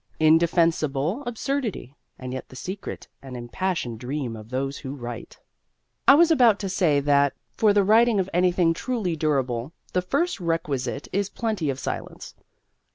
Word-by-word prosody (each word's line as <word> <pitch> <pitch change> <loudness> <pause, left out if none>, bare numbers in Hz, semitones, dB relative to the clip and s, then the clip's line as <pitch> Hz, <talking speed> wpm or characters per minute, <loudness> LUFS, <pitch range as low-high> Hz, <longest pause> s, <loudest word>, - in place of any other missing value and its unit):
Indefensible 160 - +2
absurdity, 240 - -3 0.2
and 130 0 -6
yet 130 - -6
the - - -13
secret 185 +9 -6
and 130 -2 -8
impassioned 120 -1 -3
dream 130 -1 -4
of 110 0 -11
those 135 +2 -3
who 135 0 -6
write! 120 -3 -8 0.7
I 275 - +9
was 335 +2 +5
about 245 -9 +5
to 195 - -3
say 175 -6 +2
that, 140 0 +3 0.2
for 215 -2 +4
the 205 0 +4
writing 220 +2 +4
of 185 - 0
anything 175 -1 +3
truly 210 -3 -2
durable, 135 -3 -1 0.2
the 180 - +2
first 340 - -1
requisite 145 -6 -2
is 200 +1 0
plenty 215 - -2
of 135 - -2
silence. - - -6
165 Hz, 155 wpm, -24 LUFS, 135-200 Hz, 0.7 s, I